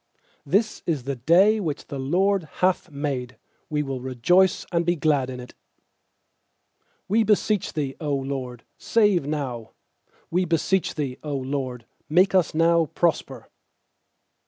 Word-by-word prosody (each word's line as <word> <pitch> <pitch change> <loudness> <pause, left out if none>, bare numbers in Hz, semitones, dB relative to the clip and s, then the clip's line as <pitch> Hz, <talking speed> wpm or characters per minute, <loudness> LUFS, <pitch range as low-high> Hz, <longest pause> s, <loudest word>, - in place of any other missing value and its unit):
24This 210 +7 +1
is 155 -7 -1
the 140 +1 -3
day 180 - +4
which 155 -7 -3
the 140 - -6
LORD 185 +7 +1
hath 185 0 0
made; 140 -4 -4 0.3
We 150 -1 0
will 135 -3 -4
rejoice 170 +9 +2
and 170 -1 +1
be 175 +1 +1
glad 145 -5 +1
in 125 -1 -6
it. 125 - -10 1.5
25We 220 +3 +3
beseech 210 -1 +1
Thee, 140 -3 -3
0 145 -2 0
LORD, 135 -3 -5 0.2
save 205 -9 +2
now! 130 -7 -4 0.6
We 180 +2 +2
beseech 170 +3 0
Thee, 140 -4 -3
0 150 -2 -4
LORD, 130 -3 -4 0.2
make 185 +5 +4
us 185 -4 +2
now 165 0 +4
to - - -32
prosper! 170 -2 -1
150 Hz, 140 wpm, -24 LUFS, 135-180 Hz, 1.5 s, day